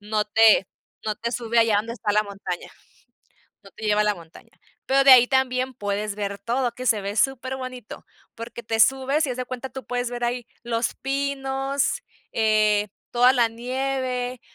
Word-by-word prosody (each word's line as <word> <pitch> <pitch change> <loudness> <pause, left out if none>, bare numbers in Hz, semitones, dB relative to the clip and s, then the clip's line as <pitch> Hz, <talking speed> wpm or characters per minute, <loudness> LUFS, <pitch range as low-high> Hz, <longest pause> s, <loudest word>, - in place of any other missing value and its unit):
No 210 0 -1
te 220 -2 +5 0.4
no 215 -1 -1
te 235 +2 -4
sube 235 0 -1
allá 225 -2 +4
donde 225 +3 -2
está 210 -3 -2
la 210 +1 +3
montaña, 195 -3 -6 0.9
no 195 - -15
te 220 - -11
lleva 210 0 +3
la 210 -1 +2
montaña. 165 -2 -15 0.4
Pero 275 +1 +3
de 275 - +8
ahí 245 -1 +8
también 260 0 0
puedes 205 0 -3
ver 200 -1 -4
todo, 240 +3 -1
que 255 +1 -7
se 220 -3 +3
ve 200 +1 -5
super 265 +2 0
bonito, 255 -3 -8 0.3
porque 230 +1 -8
te 225 0 -1
subes, 270 +5 +3
y - - -3
haz 245 - -3
de 255 - -3
cuenta, 255 +1 -6
tú 265 - -8
puedes 245 0 -2
ver 240 0 -3
ahí 240 0 -2 0.2
los 235 0 -1
pinos, 275 - -1 0.3
eh, 215 -2 +2 0.2
toda 245 +1 +5
la 240 -3 +3
nieve, 255 +1 -3
240 Hz, 180 wpm, -24 LUFS, 215-260 Hz, 0.9 s, de